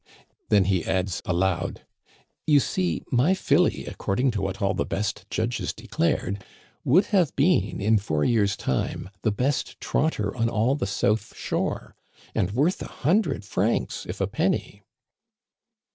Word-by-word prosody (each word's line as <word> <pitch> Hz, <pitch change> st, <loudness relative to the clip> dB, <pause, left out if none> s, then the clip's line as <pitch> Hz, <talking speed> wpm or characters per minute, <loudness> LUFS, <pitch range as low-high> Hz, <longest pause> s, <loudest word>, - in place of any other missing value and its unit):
Then 100 Hz, -2 st, +5 dB
he 95 Hz, -3 st, +1 dB
adds 95 Hz, -1 st, -1 dB
aloud: 90 Hz, 0 st, -1 dB, 0.3 s
" -, -, -37 dB
You 150 Hz, -2 st, +6 dB
see, 180 Hz, +6 st, -1 dB
my 135 Hz, +9 st, +3 dB
filly, -, -, +2 dB
according 125 Hz, +7 st, 0 dB
to 105 Hz, -3 st, -2 dB
what 95 Hz, 0 st, -3 dB
all 100 Hz, -1 st, +1 dB
the -, -, 0 dB
best 105 Hz, +1 st, -3 dB
judges 120 Hz, +1 st, -1 dB
declared, 120 Hz, -, -1 dB, 0.4 s
would 180 Hz, +10 st, +4 dB
have 180 Hz, -8 st, +3 dB
been 165 Hz, +6 st, +2 dB
in 110 Hz, +1 st, +3 dB
four 80 Hz, -7 st, 0 dB
years' 100 Hz, -5 st, +2 dB
time 65 Hz, +7 st, -2 dB
the 110 Hz, -, +1 dB
best 130 Hz, +7 st, -1 dB
trotter 110 Hz, -10 st, 0 dB
on 115 Hz, -2 st, +1 dB
all 115 Hz, +3 st, +2 dB
the 140 Hz, -8 st, -2 dB
south 105 Hz, +2 st, 0 dB
shore, -, -, -3 dB, 0.4 s
and 90 Hz, -, +1 dB
worth 145 Hz, -, +1 dB
a -, -, -4 dB
hundred 190 Hz, -, 0 dB
francs -, -, -1 dB
if -, -, -5 dB
a -, -, +2 dB
penny." -, -, -1 dB
110 Hz, 150 wpm, -25 LUFS, 100-140 Hz, 0.4 s, You